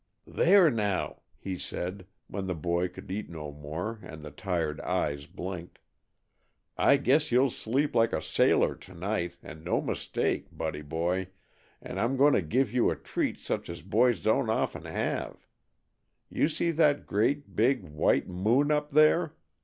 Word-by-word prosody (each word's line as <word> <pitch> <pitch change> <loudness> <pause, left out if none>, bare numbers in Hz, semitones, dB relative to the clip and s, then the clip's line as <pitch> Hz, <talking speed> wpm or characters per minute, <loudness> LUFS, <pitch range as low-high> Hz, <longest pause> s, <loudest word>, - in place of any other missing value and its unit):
"There, 180 -3 +5
now!" 105 -5 -1 0.2
he 95 -2 -5
said 90 +1 -5 0.2
when 95 -2 -5
the 90 - -1
tired 80 - -11
boy 85 +1 +1
could 90 +1 -11
eat 105 +3 -4
no 75 -3 -7
more, 80 +10 -5
and 80 -6 -10
the 75 - -8
tired 85 -4 -2
eyes 75 -6 -1
blinked, 90 -1 -7 1.0
"I - - +5
guess 145 +4 +2
you'll 125 +2 +4
sleep 135 +8 -1
like 115 -1 +3
a - - 0
sailor - - +3
to 95 - -15
night, 85 -1 -2
and 80 0 -10
no 85 - +1
mistake, - - -2
Buddy 80 -2 -4
boy, 85 +5 -1 0.6
and - - -5
I'm 130 +4 +1
going 145 +2 +5
to - - +3
give 115 - 0
you 125 - +3
a - - -1
treat - - -2
such - - -4
as 85 -1 -7
boys 110 +3 +3
don't - - +2
often - - -1
have. - - -3 0.9
You - - +2
see 170 +1 0
that 150 -3 +3
great, 110 +1 0
big, 125 +6 +3
white 75 0 +1
moon 115 +11 +2
up 150 0 +1
there? 155 +2 +4
100 Hz, 165 wpm, -29 LUFS, 85-130 Hz, 1.0 s, There